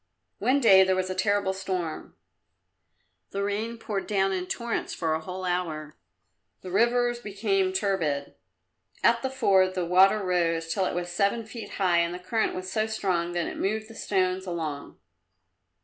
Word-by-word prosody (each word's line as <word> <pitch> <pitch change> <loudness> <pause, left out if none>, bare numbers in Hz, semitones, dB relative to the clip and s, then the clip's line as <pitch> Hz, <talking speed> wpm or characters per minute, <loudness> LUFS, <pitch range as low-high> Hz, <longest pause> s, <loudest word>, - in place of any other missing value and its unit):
One 265 +3 +3
day 195 -7 +7
there 190 0 +2
was 185 0 -1
a - - -1
terrible 200 0 +1
storm; 185 -4 -4 1.1
the 200 0 -3
rain 215 +3 -2
poured 205 -3 -4
down 195 -2 +1
in 185 -1 -3
torrents 235 +2 -3
for 160 -2 0
a 160 - 0
whole 185 +3 -6
hour. 160 -4 -2 0.7
The 185 - -8
rivers 240 +3 +2
became 200 -3 0
turbid. 180 -8 -1 0.7
At 235 0 +4
the 265 - -1
ford, 190 -8 +3
the 180 -2 -1
water 185 +4 +5
rose 165 -2 0
till 195 -2 0
it - - -3
was 175 0 -3
seven 200 +5 0
feet 225 +1 -8
high 180 -3 +3
and 170 +1 0
the - - -4
current 200 +5 -1
was 185 0 -5
so 215 +2 0
strong 180 -5 -1
that 175 -1 -1
it - - -6
moved 215 +2 -1
the - - -10
stones 185 -2 0
along. 155 -5 -5
190 Hz, 170 wpm, -27 LUFS, 175-210 Hz, 1.1 s, day